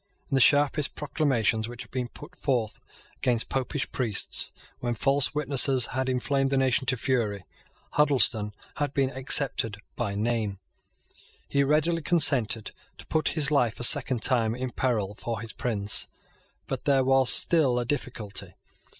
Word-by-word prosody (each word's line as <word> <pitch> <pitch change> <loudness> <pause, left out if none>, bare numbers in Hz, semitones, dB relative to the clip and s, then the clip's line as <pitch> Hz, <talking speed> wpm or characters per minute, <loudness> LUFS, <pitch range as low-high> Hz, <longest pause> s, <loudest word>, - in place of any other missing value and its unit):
In - - -4
the 135 - +3
sharpest 145 +2 +2
proclamations 125 -7 0
which 120 0 -8
had - - -21
been 125 -1 -3
put 150 +8 -13
forth 120 -6 -2 0.4
against 120 -3 -1
Popish 135 +2 -3
priests, 115 -6 0 0.3
when 120 -1 -2
false 135 +5 +2
witnesses 135 -3 +3
had 130 0 -1
inflamed 135 +2 0
the 135 - 0
nation 130 -1 +1
to 125 - +1
fury, 110 -6 -1 0.5
Huddleston 125 -8 +2 0.2
had 145 -1 -3
been 135 -1 +1
excepted 130 -5 +3 0.2
by 105 -5 -3
name. 110 -2 -2 0.9
He 140 - +1
readily 155 +4 +1
consented 140 - +2 0.3
to - - -12
put 155 - +1
his 150 -1 +3
life 120 -6 +1
a - - -3
second 130 -3 +3
time 115 -4 +1
in 125 0 -4
peril 110 -7 -1
for 115 +2 -5
his 115 0 -7
prince; 105 -4 -1 0.6
but - - -5
there 135 -2 +3
was 135 -1 +3
still 150 -8 +3
a 120 - -1
difficulty. 120 -6 -4
130 Hz, 150 wpm, -26 LUFS, 115-140 Hz, 0.9 s, the